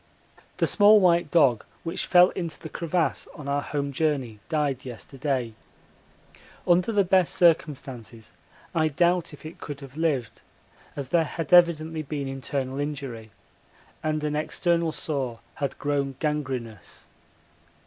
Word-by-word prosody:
The - - +2
small 210 +1 +6
white 175 -4 +3
dog 135 -9 +4 0.2
which 165 +2 -3
fell 180 0 +7
into 170 -3 -4
the 160 - -8
crevasse 170 +1 -1
on 150 -4 -9
our 140 0 0
home 140 -1 -3
journey 135 -7 -1
died 145 -5 0
yesterday. 125 0 -3 1.1
Under 175 +5 +3
the 205 -2 +3
best 185 -1 +2
circumstances 135 -9 0 0.4
I 160 -2 +2
doubt 175 +3 +1
if 150 - -13
it 155 - -9
could 145 -2 -7
have 135 +1 -11
lived, 140 -9 -1 0.5
as 140 -3 -5
there 165 +1 +3
had 165 +1 -4
evidently 165 -2 +5
been 145 -2 -4
internal 135 0 -3
injury 135 -6 -5 0.7
and 155 -1 -1
an 150 0 -1
external 170 +2 0
sore 135 -7 -3 0.2
had 140 - -2
grown 140 -2 -1
gangrenous. 130 - -4
150 Hz, 135 wpm, -26 LUFS, 135-165 Hz, 1.1 s, fell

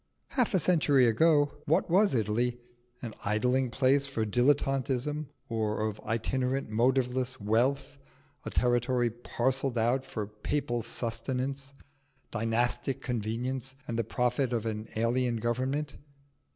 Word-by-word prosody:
Half 245 -6 +1
a - - +4
century 150 -7 +4
ago, 145 +5 +3
what - - +3
was 185 -3 +3
Italy? 120 +2 0 0.5
An 115 -3 -5
idling 125 +5 +1
place 135 +3 +2
of 110 -2 0
dilettanteism 135 +2 +1 0.2
or 110 -1 -1
of 105 -1 -5
itinerant 125 +3 -1
motiveless 125 +2 +1
wealth, 135 +7 0 0.4
a - - -4
territory 120 0 +1
parcelled 125 +2 -1
out 120 +4 +2
for 110 -5 -4
papal 120 +4 -2
sustenance, 130 +5 -3 0.6
dynastic 120 +4 0
convenience, 125 +3 -3
and 115 0 -2
the - - +2
profit 125 +3 0
of 115 -2 -1
an 110 -1 -3
alien 120 +2 +1
Government. 130 +6 -2
125 Hz, 120 wpm, -29 LUFS, 115-135 Hz, 0.6 s, a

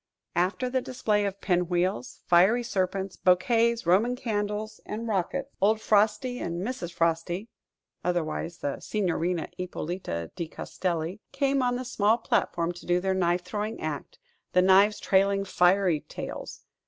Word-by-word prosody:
After 185 +9 +1
the 260 +1 0
display 215 -5 0
of 200 0 -4
pin 180 -2 +1
wheels, 175 -8 -1
fiery 190 +8 +5
serpents, 190 -3 -2
bouquets, 230 +5 +3
Roman 210 +8 +3
candles 215 -2 -3
and 225 +2 -5
rockets, 230 +7 -1
old 215 +2 +4
Frosty 220 +4 +2
and 170 0 -3
Mrs. 230 -9 -4
Frosty 170 +5 -1 0.5
(otherwise 170 -1 -2
the 140 -1 -3
Signorina 180 -4 -1
Ippolita 175 - -4
di 170 - -3
Castelli) 175 +3 -3
came 275 0 +1
on 245 -1 +1
the 255 +1 -4
small 220 -2 +2
platform 175 -6 0
to 175 - -12
do 175 0 +3
their 190 +1 0
knife 180 -1 +1
throwing 215 +1 -3
act, - - -5 0.4
the 180 - +5
knives 195 +3 +5
trailing 195 +1 +2
fiery 180 -3 +3
tails. - - -7
195 Hz, 140 wpm, -27 LUFS, 175-220 Hz, 0.5 s, fiery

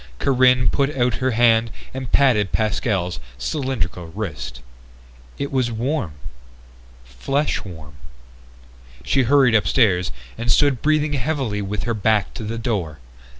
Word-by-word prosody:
Corinne 130 - +3
put 140 0 0
out 125 -1 +1
her 130 - +2
hand 115 -1 +3 0.2
and 130 -1 -6
patted 115 -9 +3
Pascal's 105 -4 -1 0.2
cylindrical 95 - -3
wrist. 80 - -6 0.8
It 140 - -4
was 130 -3 0
warm 120 - -2 0.9
flesh 135 - -2
warm. 80 -7 -10 1.1
She 100 - +2
hurried 130 -1 +4
upstairs 100 -6 +2 0.3
and 120 0 0
stood 140 -3 +3
breathing 155 -1 +1
heavily 130 -6 -1
with 100 -1 -3
her 115 - -1
back 105 -1 +1
to - - -7
the 110 +2 -4
door. 100 - -2
115 Hz, 125 wpm, -21 LUFS, 95-130 Hz, 1.1 s, hurried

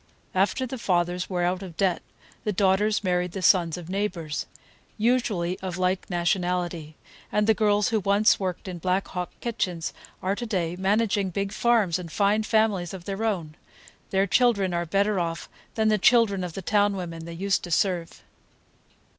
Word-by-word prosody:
After 200 +7 +1
the 255 0 -6
fathers 180 -3 0
were 180 -2 -1
out 180 +2 0
of 180 -4 -9
debt, 190 -3 +1 0.4
the 210 - 0
daughters 205 +2 +2
married 180 -1 0
the 190 - -5
sons 170 -2 +4
of 175 -2 -8
neighbors,—usually 190 +2 -2
of 185 -2 -5
like 185 0 0
nationality,—and 175 +1 -2
the 220 - +5
girls 210 0 +2
who 220 - +1
once 200 +2 +3
worked 185 -1 -3
in 180 -2 -5
Black 185 +3 0
Hawk 180 -1 -4
kitchens 185 -8 -2 0.3
are 190 +1 +1
to 240 +2 -5
day 175 -5 -1
managing 200 +1 +1
big 195 +2 -2
farms 215 -9 +2
and 170 -3 -8
fine 205 +3 +2
families 215 -5 +1
of 175 -2 -10
their 200 +2 -3
own; 175 -9 -2 0.5
their 195 0 +2
children 200 -4 +2
are 170 0 -1
better 200 +3 +1
off 170 -1 -3 0.3
than 220 -1 +2
the 215 -1 +2
children 200 -3 +4
of 175 -2 -5
the 195 - -6
town 205 +1 +2
women 165 -3 -6
they 170 - -7
used 190 +3 0
to - - -8
serve. 175 -1 0
190 Hz, 170 wpm, -26 LUFS, 175-210 Hz, 0.5 s, the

